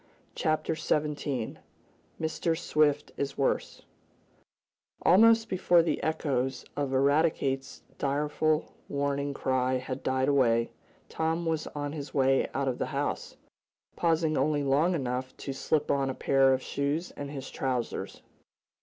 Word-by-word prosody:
Chapter 155 +1 0
Seventeen 150 -5 -2 0.6
Mr. 160 +1 -1
Swift 150 -3 +1
is 140 -1 -3
Worse 135 - -1 1.2
Almost 225 +3 +6
before 175 -2 +3
the 165 - -1
echoes 135 -5 -1
of 145 -2 -1
Eradicate's 135 -1 +1 0.2
direful 150 +2 0 0.2
warning 140 0 -1
cry 130 -1 +1
had 130 +1 -4
died 130 0 0
away, 115 -5 +3 0.4
Tom 160 +1 -1
was 160 -1 -1
on 145 -1 -3
his 145 -2 -7
way 135 -1 +3
out 140 0 0
of 130 - -1
the - - -1
house, - - -3 0.6
pausing 160 -2 +1
only 150 -1 +1
long 150 +6 +2
enough 130 -2 -3
to 135 - -5
slip 150 +2 0
on 135 -1 +1
a 130 - -3
pair 135 -1 +3
of 130 0 +1
shoes 145 +5 -2
and 145 -1 -7
his 135 -2 -7
trousers. 125 -3 -3
140 Hz, 130 wpm, -29 LUFS, 135-155 Hz, 1.2 s, Almost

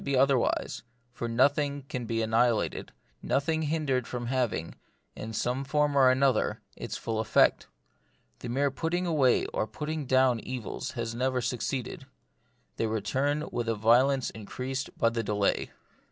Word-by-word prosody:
85 - - -10
be 135 - +2
otherwise; 135 -2 +1 0.3
for 120 - -4
nothing 140 +4 +2
can 130 -3 -5
be 115 0 0
annihilated, 115 0 +1 0.3
nothing 160 +3 0
hindered 150 -5 0
from 120 -1 -4
having, 120 -10 -1 0.4
in 110 - -6
some 125 +5 -1
form 150 +1 +1
or 135 -2 +6
other, 130 -2 +2 0.2
its - - -5
full 115 -1 -3
effect. 110 - +3 0.7
The - - -6
mere 140 +3 +1
putting 165 +6 -1
away 145 -7 +3
or 110 - -1
putting 150 +5 -4
down 130 -2 +4
evils 125 0 -5
has 115 -2 -3
never 130 +2 0
suc 125 0 -2
ceeded. 130 +1 -4 0.7
They 115 - 0
return 135 +8 -1
with 120 -1 -2
a 115 - +1
violence 125 +5 +3
increased 130 +5 -5
by 115 - +3
the 115 0 -2
delay. 105 -2 0
130 Hz, 155 wpm, -28 LUFS, 115-140 Hz, 0.7 s, or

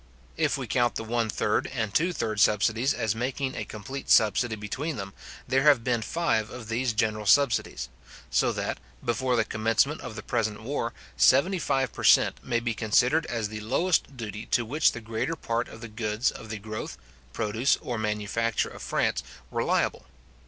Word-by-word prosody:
If - - +1
we - - -4
count 120 -1 +1
the - - -3
one 115 0 -1
third 105 - 0
and 110 -6 -3
two 170 +8 +2
third 110 -10 -2
subsidies 110 +5 +3
as 115 -4 0
making 130 +3 -2
a - - -4
complete 130 +6 -7
subsidy 110 +2 +4
between 130 +9 -4
them, 95 -2 -6 0.3
there 130 +1 +2
have 140 -5 +5
been 120 -2 +1
five 110 -7 0
of 115 -3 -9
these 120 +2 0
general 110 -1 0
subsidies; 140 -2 +3 0.4
so - - +3
that, - - -3 0.3
before 125 +1 +1
the 115 -2 +2
commencement 115 +7 +1
of 125 -4 -7
the 110 - -7
present 110 -3 -1
war, 120 -2 -2 0.3
seventy 175 +9 +4
five 135 -4 0
per - - -7
cent. - - +5
may 120 -2 0
be 115 0 -2
considered 125 +8 +2
as 115 -3 -2
the 110 0 -6
lowest 135 +5 0
duty 105 -2 -6
to 120 - +1
which 150 +8 +2
the 120 - -7
greater 115 +8 -2
part 115 -5 -2
of 110 - -12
the 115 - -6
goods 110 +1 -1
of 110 - -10
the 110 - -4
growth, 110 +1 -6 0.3
produce, 110 +6 +1
or 120 -2 -4
manufacture 105 +1 -1
of - - -11
France, - - 0 0.3
were - - 0
liable. - - 0
115 Hz, 185 wpm, -27 LUFS, 110-130 Hz, 0.4 s, have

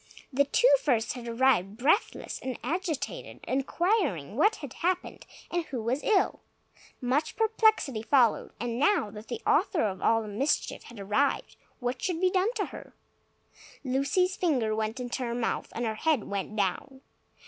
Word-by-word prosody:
The 280 +2 +3
two - - +5
first 235 -6 +1
had 245 -2 -8
arrived, 230 -5 +2
breathless 305 - +1
and 260 -1 -4
agitated, 320 -5 -3
inquiring 275 - 0
what 420 - +4
had 285 -5 -8
happened, 360 +1 -2 0.2
and 345 -1 0
who 260 - -5
was 240 +6 -1
ill. 415 -4 +2 0.6
Much 275 +5 0
perplexity 440 - +2
followed. 235 0 +3
And 235 0 -2
now 290 - +2
that 210 +1 -10
the 455 - -5
author 330 - +2
of 190 -3 -2
all 225 0 +3
the - - -8
mischief 230 +8 -1
had 240 -3 -11
arrived, 210 +9 0 0.2
what 245 0 -3
should 355 -3 -1
be 370 0 +3
done 380 +4 +2
to - - 0
her? - - -10 0.9
Lucy's 280 +8 +1
finger 250 -11 +1
went 220 +3 -2
into 250 +1 -4
her 235 -1 -2
mouth, 240 -1 -2
and 235 - -1
her 220 - -1
head 285 +1 +1
went 200 +1 -4
down. 220 +7 -2
260 Hz, 160 wpm, -28 LUFS, 225-335 Hz, 0.9 s, two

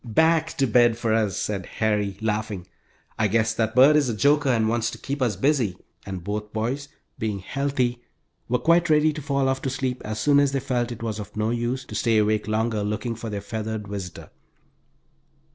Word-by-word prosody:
"Back 160 +7 +2
to 135 - +3
bed 120 -1 +4
for 115 -2 0
us," 110 -4 +1
said 100 -3 -2
Harry, 105 -3 0
laughing. 105 -4 -2 0.5
"I 110 - +3
guess 110 +2 +1
that 110 0 -1
bird 135 +4 +7
is 145 -4 +3
a 115 - -1
joker 145 +4 +3
and 115 -3 +2
wants 115 0 0
to - - -8
keep 140 0 -5
us 120 -5 +1
busy," 120 -4 +1 0.3
and 95 -3 -5
both 105 +2 -4
boys 125 +6 -2 0.3
being 110 -2 -1
healthy 125 +3 -1 0.5
were 125 - +3
quite 170 +4 +3
ready 155 0 +4
to 150 - -6
fall 140 -1 0
off 130 0 0
to 135 - -2
sleep 130 -1 -2
as 110 0 -4
soon 145 +4 +4
as 140 -1 +2
they 135 - +1
felt 125 -2 -1
it 115 -1 -7
was 110 -2 -3
of 105 0 -8
no 110 +1 0
use 120 +2 -2
to - - -10
stay 115 -2 +2
awake 105 0 +1
longer 110 0 0
looking 105 +3 -2
for 115 0 -6
their 100 -1 -4
feathered 110 0 -4
visitor. 95 -4 -7
115 Hz, 205 wpm, -24 LUFS, 105-135 Hz, 0.5 s, bird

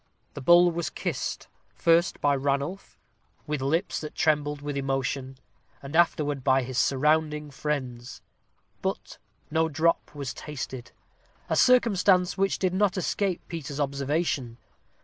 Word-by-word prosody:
The 145 - -7
bowl 175 +5 +6
was 170 0 -3
kissed, - - -4 0.3
first 170 +1 +3
by 145 -1 +3
Ranulph, 140 +7 -2 0.5
with 150 -2 -3
lips 160 +8 0
that 155 - -7
trembled 150 -1 +1
with 145 -1 -4
emotion, 135 -1 -2 0.5
and 140 +3 -7
afterward 150 -5 +2
by 130 -1 +3
his 125 0 -2
surrounding 150 +2 +1
friends; 130 -5 -4 0.6
but - - -4 0.3
no 160 +1 +2
drop 160 0 0
was 140 -3 -4
tasted 130 -4 -7 0.6
a - - +3
circumstance 200 -7 +4
which 195 0 +1
did 185 -1 0
not 195 0 +1
escape 185 0 -1
Peter's 150 -4 -6
observation. 140 -3 -1
150 Hz, 130 wpm, -27 LUFS, 135-170 Hz, 0.6 s, bowl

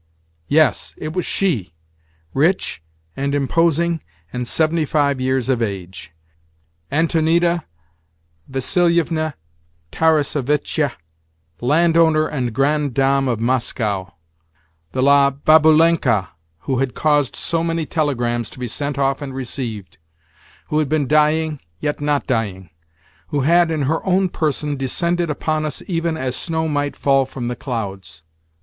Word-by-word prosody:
_ - - -42 0.4
Yes, 155 -2 +2
it 155 0 -5
was 180 - -2
she—rich, 80 - -2 0.3
and 140 +1 -1
imposing, 165 +3 +1 0.3
and 125 -1 -3
seventy 160 +2 +1
five 140 -3 +1
years 130 -1 0
of 130 -3 +1
age—Antonida 95 - -2 0.8
Vassilievna 160 +2 +1 0.6
Tarassevitcha, 150 -2 +1 0.7
landowner 160 +3 +3
and 125 -5 -2
grande 140 +2 0
dame 135 0 +2
of 120 -4 -1
Moscow—the 80 -7 -4
"La 140 0 +5
Baboulenka" 155 - +4 0.3
who 130 -2 -1
had 135 -2 -1
caused 145 -4 +1
so 165 -1 -1
many 165 -1 -1
telegrams 120 -8 -1
to - - -14
be 125 -1 -4
sent 140 +4 -3
off 135 0 0
and 135 -2 -6
received—who 100 - -7
had 150 -3 0
been 155 -2 +1
dying, 155 +1 +2 0.2
yet 145 +7 -2
not 145 -1 0
dying—who 85 - -5
had, 170 +4 +4
in 155 -3 -1
her 155 +4 0
own 190 0 +2
person, 150 -3 -1
descended 170 +6 -1
upon 155 +1 -1
us 155 - -4
even 165 -3 -1
as 130 -3 -2
snow 160 -1 -2
might 145 -1 -1
fall 135 -1 +2
from 120 -3 -5
the 125 - -3
clouds! 95 - -6
140 Hz, 120 wpm, -20 LUFS, 115-155 Hz, 0.8 s, La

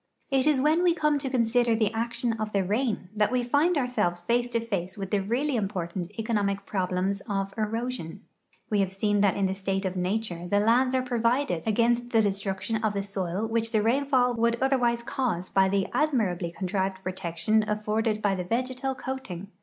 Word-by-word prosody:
It 270 +1 +3
is 295 -3 +4
when 305 +5 +3
we 350 -2 +3
come 300 -3 +2
to 275 -1 -3
consider 240 -1 +2
the 220 -1 +1
action 235 +1 -1
of 215 -1 -4
the 195 -1 +2
rain 210 -1 -1
that 210 +1 +2
we 250 -1 +1
find 295 +8 +2
ourselves 215 -10 0
face 240 +5 +1
to 235 - 0
face 195 -5 -3
with 195 -1 -5
the 205 -2 +2
really 250 +8 0
important 185 -4 -3
economic 205 -3 -1
])rohlems 190 0 -1
of 195 -1 -2
erosion. 220 -4 -3 0.5
^Ve 210 - +2
have 190 -1 +1
seen 205 +1 +1
that 200 -2 +3
in 200 - +1
the 190 - 0
state 195 0 -2
of 190 0 -2
nature 180 -1 -2
the 205 +3 +2
lands 250 +5 +3
are 255 - +1
provided 240 - 0
against 235 +2 +2
the 225 -2 +4
destruction 195 +2 -1
of 215 -2 0
tlie 200 0 -2
soil 195 0 -2
which 225 0 -1
the 215 -3 +2
rainfall 255 +1 +2
would 235 0 +1
otherwise 245 -3 +2
cause 230 -9 -2
b\' 190 0 +3
the 195 -1 +1
admirably 205 - +1
contrived 190 +1 -2
]>rotection 185 +4 0
afforded 215 +1 -1
by 200 -1 +3
the 185 -1 -2
vegetal 255 +6 -2
coating. 250 -9 -6
215 Hz, 190 wpm, -27 LUFS, 195-245 Hz, 0.5 s, is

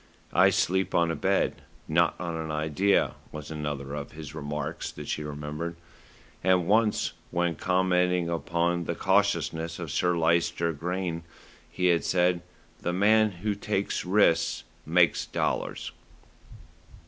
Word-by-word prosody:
"I - - +6
sleep 95 +1 +1
on 85 -1 +3
a - - -2
bed, - - 0 0.3
not 85 +2 +3
on 85 -2 -3
an 80 -1 -4
idea," 80 +6 +1 0.2
was 75 0 -8
another 75 -3 -4
of 75 -1 -6
his 75 -1 -8
remarks 75 +1 -4
that - - -9
she - - -2
remembered, 75 +3 -5 0.7
and 90 -1 +3
once 110 +3 +2 0.2
when 85 0 0
commenting 90 -1 +1
upon 85 +1 0
the 85 - -2
cautiousness 85 -4 +1
of 85 -4 -5
Sir 90 +3 +1
Lyster 85 0 +1
Grayne 85 +2 -3 0.5
he 90 - -2
had 85 - 0
said, 90 -1 +2 0.4
"The 85 - -2
man 110 +3 +4 0.2
who 105 - +2
takes 100 -1 -2
risks 95 -2 +2 0.2
makes - - +3
dollars." - - -2
85 Hz, 135 wpm, -27 LUFS, 80-90 Hz, 0.7 s, I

